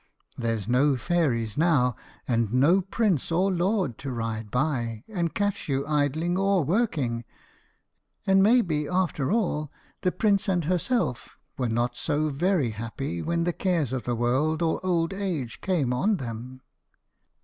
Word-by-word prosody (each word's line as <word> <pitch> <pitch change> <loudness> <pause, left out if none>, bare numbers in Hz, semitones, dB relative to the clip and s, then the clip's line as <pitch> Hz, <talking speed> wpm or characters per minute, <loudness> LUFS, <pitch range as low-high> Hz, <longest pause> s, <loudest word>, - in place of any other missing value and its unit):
There's 115 -4 -2
no 135 +4 +3
fairies 125 - 0
now, 140 -8 +3 0.3
and 115 -3 +1
no 145 +10 +4
prince 195 - 0
or 185 +4 +2
lord 180 - 0
to 135 -1 -5
ride 115 -2 -3
by, 120 -4 -1
and 175 -6 -2
catch 205 -5 -1
you 135 0 0
idling 155 +4 0
or 195 -3 +2
working; 145 - 0 1.0
and 195 0 +5
maybe, 190 -9 +3
after 180 -5 0
all, 165 -10 0 0.3
the 180 - +1
prince 205 0 +1
and 180 -3 +1
herself 180 - -1 0.2
were 125 -3 -1
not 120 +2 0
so 155 +1 0
very 155 - +1
happy 110 -4 -4
when 170 +1 0
the 175 0 0
cares 165 - 0
of 130 - -3
the 120 - 0
world 135 +8 +1
or 165 +2 0
old 175 -1 +1
age 165 - -3
came 155 -10 0
on 195 +11 +1
them." 125 0 -7
150 Hz, 150 wpm, -26 LUFS, 125-185 Hz, 1.0 s, and